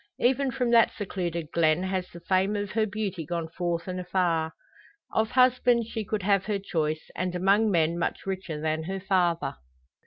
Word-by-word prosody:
Even 265 +2 +2
from 250 -1 -1
that 230 -1 +6
secluded 170 -5 -4
glen 165 +1 +2
has 185 -1 -2
the 175 - -12
fame 190 +4 +1
of 205 -1 -3
her 220 0 +1
beauty 195 -4 -3
gone 165 +1 -3
forth 170 0 -3
and 185 0 -3
afar. 175 -3 0 0.6
Of 220 0 +2
husbands 250 -2 +3
she 220 - -3
could 205 0 -3
have 195 -1 +2
her 210 -1 0
choice, 155 -5 -2
and 180 +1 -2
among 200 +4 +3
men 170 -2 +2
much - - -2
richer 185 -5 -4
than 155 +1 -1
her 190 +2 -3
father. 180 - 0
185 Hz, 180 wpm, -27 LUFS, 170-210 Hz, 0.6 s, that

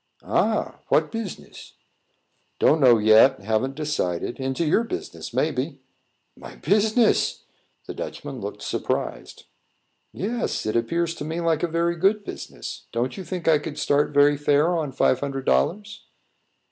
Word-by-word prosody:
"Ah! - - 0
what - - +2
business?" 225 -5 -7 0.8
"Don't 155 +1 +3
know 125 -3 +7
yet; 110 +5 +5
haven't 110 +6 -1
decided. 135 - -2
Into 135 +5 -1
your 185 +9 +3
business, 365 +11 -6
maybe." - - -1 0.6
"My - - -11
business!" 215 +2 +2 0.4
The - - -6
Dutchman - - -7
looked - - -6
surprised. - - -3 0.7
"Yes; 235 +4 -3
it 110 - -1
appears 165 +9 0
to 170 - -7
me 160 +3 -4
like 165 -2 +1
a 175 - +1
very 170 +1 0
good 200 +4 +2
business. - - -8
Don't 120 +2 -2
you 190 - -6
think 180 -2 -5
I 155 -2 +5
could 150 0 -7
start 145 0 +1
very 145 0 +4
fair 145 +4 +2
on 155 -4 -2
five 130 - +2
hundred 135 -1 -4
dollars?" 210 +4 0
155 Hz, 145 wpm, -24 LUFS, 135-180 Hz, 0.8 s, know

